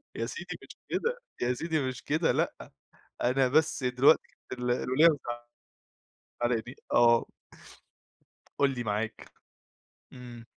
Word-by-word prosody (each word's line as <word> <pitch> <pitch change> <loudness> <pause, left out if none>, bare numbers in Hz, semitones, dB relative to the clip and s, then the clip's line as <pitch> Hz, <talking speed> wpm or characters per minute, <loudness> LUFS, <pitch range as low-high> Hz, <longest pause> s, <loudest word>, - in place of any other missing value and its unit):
يا - - -2
سيدي - - -6
مش - - -13
كده، 480 +1 -1 0.2
يا 125 +1 +2
سيدي 160 +4 -1
مش 130 -3 -4
كده 155 +3 +1
لأ، - - 0 0.7
أنا 130 +2 +3
بس 155 +1 +2
دلوقت 125 +4 +5 0.3
ال 125 -1 -2
الوليّة 130 +5 +2
مزع 120 -6 0 1.0
مزعلاني 120 +1 -1 0.2
آه. 120 -1 +5 1.3
قُل 140 - +4
لي 120 - -3
معاك. 110 +1 -3 0.8
إمم. 120 -2 -10
125 Hz, 120 wpm, -29 LUFS, 120-145 Hz, 1.3 s, دلوقت